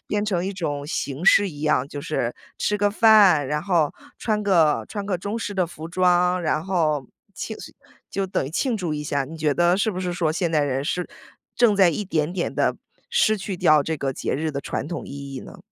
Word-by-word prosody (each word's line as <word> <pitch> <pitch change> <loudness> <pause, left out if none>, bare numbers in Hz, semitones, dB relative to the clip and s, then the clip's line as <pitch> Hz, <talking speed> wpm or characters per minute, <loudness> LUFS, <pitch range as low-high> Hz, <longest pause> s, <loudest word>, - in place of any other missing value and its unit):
变 210 0 0
成 185 -4 -1
一 195 - -2
种 145 -6 -3
形 145 +1 -4
式 200 0 +6
一 145 -3 -10
样， 150 -4 +1
就 145 0 -7
是 120 -3 -2 0.2
吃 210 - 0
个 205 0 +2
饭， 200 -9 +6
然 150 +2 -2
后 170 -6 +1 0.3
穿 215 -2 -1
个， 165 -7 +3
穿 205 -2 -5
个 195 - 0
中 200 +5 -4
式 210 -2 -4
的 185 -2 +2
服 160 -1 -8
装， 180 0 +2
然 155 -1 0
后 155 -7 0 0.3
庆 - - -6
诉 - - -10 0.4
就 195 0 -2
等 185 - -1
于 135 - -6
庆 240 - 0
祝 175 -6 -3
一 150 0 -4
下， 140 -2 -1
你 160 +4 -9
觉 150 -2 +1
得 175 +3 +3
是 200 +3 +1
不 185 - -4
是 180 -1 -2
说 165 -3 0
现 170 0 -1
代 155 -2 +2
人 135 0 -1
是 180 +2 -2 0.5
正 235 -4 +4
在 190 -3 +6
一 210 - -3
点 160 -2 -1
点 180 -2 -2
地 - - +1 0.3
失 465 - +3
去 195 -1 -4
掉 155 -5 +4
这 160 -1 -2
个 135 -1 -2
节 - - -3
日 155 +3 -1
的 140 -1 -4
传 145 - -4
统 170 -2 -5
意 140 0 -8
义 - - -4
呢？ 195 +7 -11
175 Hz, 250 characters per minute, -23 LUFS, 150-195 Hz, 0.5 s, 式